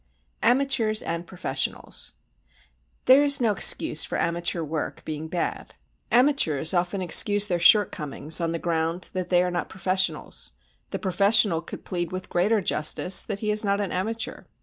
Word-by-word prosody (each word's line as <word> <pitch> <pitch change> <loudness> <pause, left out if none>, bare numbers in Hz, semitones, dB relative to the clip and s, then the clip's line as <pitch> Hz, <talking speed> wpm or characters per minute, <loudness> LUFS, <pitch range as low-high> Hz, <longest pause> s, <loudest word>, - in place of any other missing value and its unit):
Amateurs 240 -3 +2
and 170 +1 -4
Professionals 150 -7 -2 0.9
There 260 +2 +7
is 285 0 +4
no 230 -4 +2
excuse 165 -5 +3
for - - -3
amateur 170 0 -1
work 155 0 -5
being 155 0 -5
bad. 170 +1 -4 0.3
Amateurs 235 - +2
often 180 +2 -1
excuse 205 +4 +3
their 175 -4 -1
shortcomings 165 -5 +3
on 165 -1 -1
the 165 - -2
ground 165 +1 -2
that 185 -1 -4
they 180 -1 +3
are 180 - -2
not 175 - -3
professionals, 190 0 -2 0.4
the - - -4
professional 195 -2 +2
could 165 - -10
plead 175 -2 -4
with 185 0 -6
greater 205 +5 +1
justice 175 +2 0
that 205 -2 -5
he 210 -1 0
is 210 +1 0
not 200 -1 0
an 200 -2 -3
amateur. 225 +5 -3
185 Hz, 155 wpm, -25 LUFS, 170-210 Hz, 0.9 s, There